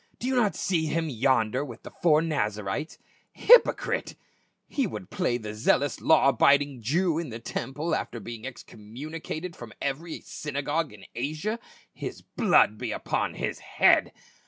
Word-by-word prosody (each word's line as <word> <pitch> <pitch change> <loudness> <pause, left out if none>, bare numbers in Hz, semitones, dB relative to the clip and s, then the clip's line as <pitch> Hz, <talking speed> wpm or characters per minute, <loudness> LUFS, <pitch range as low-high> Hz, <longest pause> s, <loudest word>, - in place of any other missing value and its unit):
" - - -35
Do - - -5
you 260 - +1
not 225 -5 +2
see 165 -5 0
him 160 +1 -1
yonder 130 0 +2
with 120 -5 -9
the - - -9
four 155 -2 +3
Nazarites? 105 -3 -2 0.4
Hypocrite! - - +4 0.5
he 275 -5 0
would 185 - -8
play 180 -12 0
the 110 -3 -6
zeal 110 +5 +3
ous 145 - -4
law 160 -3 +5
abiding 140 -2 +3
Jew 160 - +1
in 165 -4 -4
the 115 - -6
temple 145 +7 -4
after 120 - -2
being 115 +1 -8
excom 110 -3 -11
municated 160 +3 -5
from 120 -3 -10
every 155 +4 -3
synagogue 145 +2 -3
in 105 -2 -13
Asia. 155 - -3 0.3
His - - -7
blood 105 0 +3
be 120 -3 -3
upon - - -2
his - - -3
head - - +3
145 Hz, 160 wpm, -27 LUFS, 120-165 Hz, 0.5 s, law